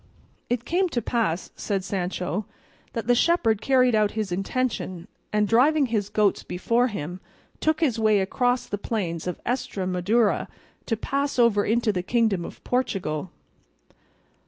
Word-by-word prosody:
"It 245 0 -1
came 365 +5 +1
to 240 - -1
pass," 215 -9 -1
said 195 -2 -2
Sancho, 185 0 -2 0.5
"that 230 -3 -3
the 245 - +4
shepherd 235 - +2
carried 255 -2 +4
out 210 -1 +2
his 210 -4 -1
intention, 195 -2 -2 0.2
and 210 0 +2
driving 275 +7 +4
his 215 -4 -1
goats 210 -2 +2
before 230 +7 +1
him 180 - -5 0.4
took 315 +1 +1
his 250 -8 +2
way 215 -2 +4
across 245 +6 +1
the 205 - -4
plains 180 -7 -3
of 180 - -3
Estremadura 205 -2 0 0.4
to 225 - 0
pass 280 +5 -1
over 230 -4 +4
into 225 -1 +2
the 180 - -1
Kingdom 215 -2 +1
of - - -10
Portugal. 190 - -1
220 Hz, 145 wpm, -25 LUFS, 190-245 Hz, 0.5 s, the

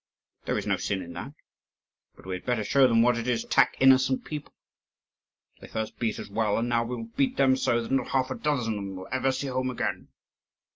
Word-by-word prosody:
There - - 0
is - - -3
no - - +1
sin 95 -2 -2
in 85 - -9
that. - - -7 0.8
But - - -17
we 95 - -4
had 90 - -5
better 120 -3 0
show 135 +5 +4
them 115 -1 +4
what 120 -1 +3
it 115 - -4
is 120 -2 +1
to - - -10
attack 125 -3 +3
innocent 130 0 +4
people. 150 -1 -6 1.1
They - - -11
first 110 0 -5
beat 115 -2 -1
us - - -7
well, 105 0 0
and 115 - 0
now 115 -1 +1
we 120 +2 -4
will 115 -1 -8
beat 135 - +1
them 135 -1 +4
so 120 -3 +1
that 115 - -7
not 135 -2 +1
half 130 -1 0
a - - -2
dozen 130 -7 -1
of - - -4
them 95 -1 -6
will 95 0 -9
ever 130 +1 +1
see 130 +2 -3
home 130 -1 -1
again." 125 - -3
120 Hz, 240 wpm, -27 LUFS, 115-130 Hz, 1.1 s, show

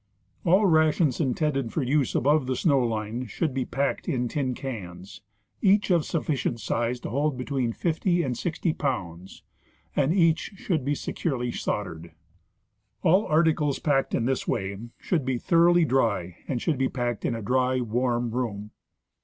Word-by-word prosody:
All 190 +5 +5
rations 155 -4 +3
intended 135 -3 0
for 155 - -1
use 135 +1 +1
above 145 0 +2
the 130 - 0
snow 140 -3 +3
line 115 +1 -2
should 140 - -2
be 130 -1 -1
packed 140 +6 -2
in 125 -6 0
tin 130 0 -2
cans, 95 -8 -7 0.4
each 200 0 +3
of 170 -4 +3
sufficient 140 -7 -1
size 120 +2 -1
to - - -5
hold 140 +1 0
between 125 -2 -1
fifty 175 - 0
and 125 -3 -2
sixty 165 +3 -1
pounds, 95 - -4 0.5
and 145 +1 +2
each 165 +1 +2
should 170 -6 -1
be 145 +2 0
securely 125 -5 -2
soldered. 85 -8 -4 0.9
All 185 +6 +4
articles 155 -3 +2
packed 135 -3 +1
in 115 - 0
this 130 +1 -1
way 100 -5 -2 0.2
should 165 -6 -1
be 130 -1 -1
thoroughly 170 +4 +4
dry 105 - 0
and 130 - -1
should 150 +1 -1
be 130 - +2
packed 120 -2 -3
in 115 - 0
a 115 - -5
dry, 130 +2 +1
warm 120 0 0
room. 105 -4 -3
130 Hz, 160 wpm, -26 LUFS, 120-155 Hz, 0.9 s, All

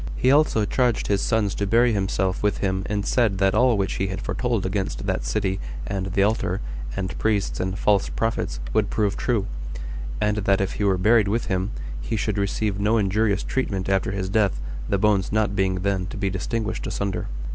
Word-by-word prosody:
He 130 - +3
also 140 -7 +4
charged 120 0 +1
his 100 -1 +1
sons 110 -3 +1
to 100 - -2
bury 115 +3 +4
himself 95 -2 0
with 105 0 +1
him 95 -1 0
and 100 -1 -1
said 115 -6 +2
that 95 0 +3
all 120 +1 +4
which 95 -1 -1
he 95 - +1
had 95 0 -4
foretold 120 -6 -1
against 95 0 -2
that - - -1
city, 95 +10 -1 0.3
and 95 -1 -2
the 100 +1 +2
altar, 110 +2 0 0.4
and 95 -1 -3
priests, 105 -3 0
and 95 +1 -2
false 100 -1 +2
prophets, 115 - -2
would 105 -2 +2
prove 105 -2 0
true; 115 -6 0 0.7
and 105 0 +1
that 100 -1 +2
if 95 0 0
he 105 - -3
were 95 -2 +3
buried 105 +2 +4
with 115 +4 0
him, 95 +2 0 0.3
he 60 - -3
should 105 -1 -1
receive 100 0 -1
no 105 +3 +2
injurious 105 0 +1
treatment 100 -8 -2
after 95 -1 +1
his 95 -2 -2
death, 100 - +1 0.3
the 100 - +2
bones 100 -1 +2
not 105 -1 +1
being 95 -1 +1
then 95 -1 0
to 110 - -7
be 100 -1 -1
distinguished 110 +3 -2
asunder. 100 -1 -2
100 Hz, 200 wpm, -24 LUFS, 95-110 Hz, 0.7 s, also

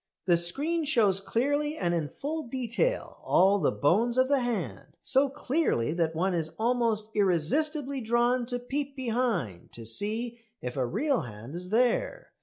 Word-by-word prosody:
The 175 -2 +4
screen 285 - +1
shows 215 -9 +3
clearly 290 +9 0
and 175 -2 0
in 160 -4 -1
full 310 - -5
detail 260 - -2
all 195 +3 +4
the - - +2
bones 225 - +2
of 260 +1 +3
the 285 -1 +3
hand 245 -2 -4
so 270 +1 +4
clearly 275 - 0
that 165 -2 0
one 185 +3 0
is 160 -2 -2
almost 230 -2 0
irresistibly 265 - +1
drawn 240 +2 +1
to 245 0 -2
peep 275 +3 -4
behind 230 - -2
to 115 - -7
see 220 - 0 0.2
if 125 - -5
a 130 -3 0
real 260 - 0
hand 115 +3 -9
is 180 +1 -6
there. 245 - 0
235 Hz, 160 wpm, -28 LUFS, 175-270 Hz, 0.2 s, The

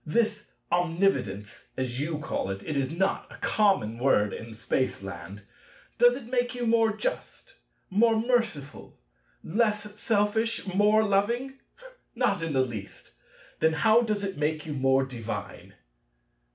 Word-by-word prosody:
This 210 +4 0 0.2
omnividence, 165 - 0
as 130 -1 -2
you 155 +2 -2
call 145 -9 -3
it—it 100 +11 -4
is 135 -1 0
not 190 +4 -1
a - - -11
common 190 - +1
word 105 -6 +2
in 115 0 -8
Spaceland—does 100 - -2
it 265 - -7
make 245 0 -1
you 245 -1 -2
more 225 -1 +3
just, - - -4 0.4
more 225 +3 +4
merciful, 225 - -2 0.5
less 210 +1 -1
selfish, 220 0 +1
more 210 +3 +4
loving? 235 +7 0 0.6
Not 230 -7 +1
in 165 -2 -2
the 130 -1 +3
least. 110 -5 -8 0.5
Then 160 0 +3
how 220 +7 +4
does 215 -3 -1
it 195 -1 -4
make 155 0 -1
you 155 - -4
more 135 -1 +2
divine? 120 -4 -7
195 Hz, 130 wpm, -27 LUFS, 130-225 Hz, 0.6 s, more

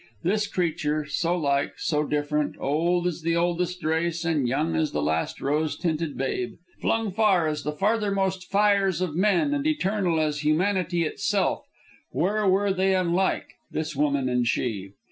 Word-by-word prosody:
This 210 +4 +1
creature, 155 -4 -1
so 165 +4 0
like, 140 -3 0
so 150 -1 0
different; 150 0 -1
old 170 +5 +1
as 175 -1 -2
the 165 +1 0
oldest 175 +1 -1
race, 165 +2 0
and 155 -6 +1
young 150 +6 0
as 155 -1 0
the 75 - 0
last 80 +2 -1
rose 150 +1 0
tinted 160 -3 -2
babe; 130 -2 -2 0.2
flung 225 -2 0
far 195 -4 +3
as 150 -1 -2
the 150 - -2
farthermost 195 0 0
fires 200 -3 +3
of 175 -5 -2
men, 205 - +2
and 290 +1 0
eternal 195 - +1
as 150 -1 0
humanity 175 +3 +1
itself 155 - -1 0.4
where 205 +4 0
were 195 +1 +3
they 190 0 +2
unlike, 185 +1 0 0.2
this 155 -1 -3
woman 140 -2 +1
and 125 -1 +1
she? 100 -6 -2
170 Hz, 160 wpm, -25 LUFS, 150-190 Hz, 0.4 s, far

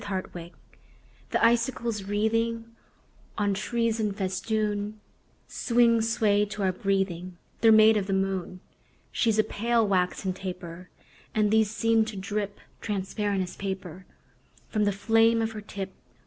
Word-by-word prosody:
SILVER 190 -2 -3
FILIGREE 170 0 -9 0.8
The - - +2
icicles 235 -2 +1
wreathing 225 +2 -1 0.6
On 205 -2 +1
trees 230 +2 -1
in 210 -2 0
festoon 205 +2 -2 0.5
Swing, 235 -1 +3
swayed 210 -2 +2
to 205 -1 -4
our 190 - +3
breathing: 185 -2 -2 0.2
They're 225 - +6
made 220 0 +7
of 200 -2 -1
the 195 - -1
moon. 190 -1 -2 0.5
She's 225 -2 +1
a 215 - +5
pale, 230 +1 +1
waxen 185 0 0
taper; 180 -2 -7 0.5
And 210 -1 +2
these 220 -1 +4
seem 225 0 +2
to 220 -1 -7
drip 205 +1 -3 0.2
Transparent 200 -1 -1
as 180 - -8
paper 190 -2 -6 0.6
From 210 -2 +1
the 205 - +2
flame 225 +3 +3
of 225 0 0
her 215 -1 -7
tip. 195 -2 -6
205 Hz, 140 wpm, -27 LUFS, 190-225 Hz, 0.8 s, made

